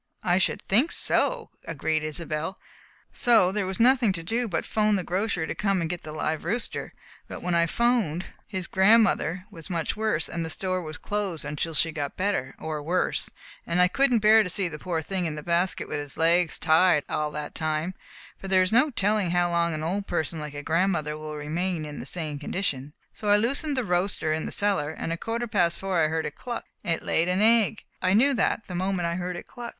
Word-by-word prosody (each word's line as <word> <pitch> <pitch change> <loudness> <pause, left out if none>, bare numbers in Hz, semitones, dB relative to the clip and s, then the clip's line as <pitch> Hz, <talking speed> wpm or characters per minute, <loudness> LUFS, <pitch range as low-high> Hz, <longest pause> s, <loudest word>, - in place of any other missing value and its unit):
"I 180 +1 +3
should 190 - +1
think 245 - +3
so!" 485 -2 +1
agreed 160 -1 -1
Isobel. 155 +3 -3 0.6
"So 230 -7 +4
there 200 -1 -1
was 190 +2 -3
nothing 245 -2 +5
to 165 -2 -5
do 230 +7 -1
but 175 - -2
'phone 215 -1 +2
the 190 - -1
grocer 180 -1 -1
to - - -3
come 195 -2 0
and 165 - -1
get 175 +1 -4
the 155 - -8
live 155 0 -2
roaster, 225 +8 -2 0.4
but - - -8
when 180 0 -1
I 170 0 +3
'phoned, 220 -6 +1 0.2
his 190 -4 -3
grandmother 190 -3 +3
was 165 -5 -9
much 170 -3 -2
worse, 215 -7 0
and 170 -1 -3
the 160 - -4
store 185 +2 -1
was 155 -2 -7
closed 200 -6 -3
until 155 +2 -3
she 165 +2 +2
got 145 -2 -4
better 185 -9 -1
or 155 -1 -4
worse 175 +5 -1 0.4
and 170 +1 0
I 180 - +6
couldn't 245 +1 +2
bear 220 +1 +8
to 200 - -2
see 185 +1 0
the 150 -3 -7
poor 165 -2 -2
thing 185 +1 -2
in 155 - -4
the 150 - -7
basket 175 +3 0
with - - -3
its 145 -2 -7
legs 170 +1 +3
tied 160 -1 +4
all 150 0 -1
that 150 0 -5
time, 155 +3 -2 0.5
for 195 - -7
there 190 -1 +4
is 185 - -1
no 255 +7 +4
telling 210 -5 +1
how 175 0 +2
long 170 0 +2
an 155 - -4
old 195 +5 -2
person 160 -1 -2
like 150 -1 -7
a 145 - -6
grandmother 165 -2 0
will 155 0 -7
remain 160 +3 -2
in 150 -1 -7
the - - -5
same 155 -5 -3
condition, 145 -4 -3 0.2
so 210 - -4
I 205 - +6
loosened 275 +6 0
the 255 - 0
roaster 180 -3 0
in 155 - -2
the - - -5
cellar, 200 -8 +1
and 160 +1 -5
at - - 0
a - - -32
quarter 230 +1 -2
past 180 -6 +1
four 190 -2 -1
I - - +3
heard 160 +1 -1
it 150 - -4
cluck. 240 +8 -6 0.2
It - - -5
had 165 - 0
laid 165 - +1
an 185 +3 +2
egg. 225 -1 +3 0.2
I 185 +1 +3
knew 275 +6 +5
that 225 -1 +1
the 180 - -8
moment 185 0 -1
I 170 - 0
heard 180 0 -3
it - - -7
cluck." 240 -1 -8
180 Hz, 230 wpm, -26 LUFS, 160-205 Hz, 0.6 s, bear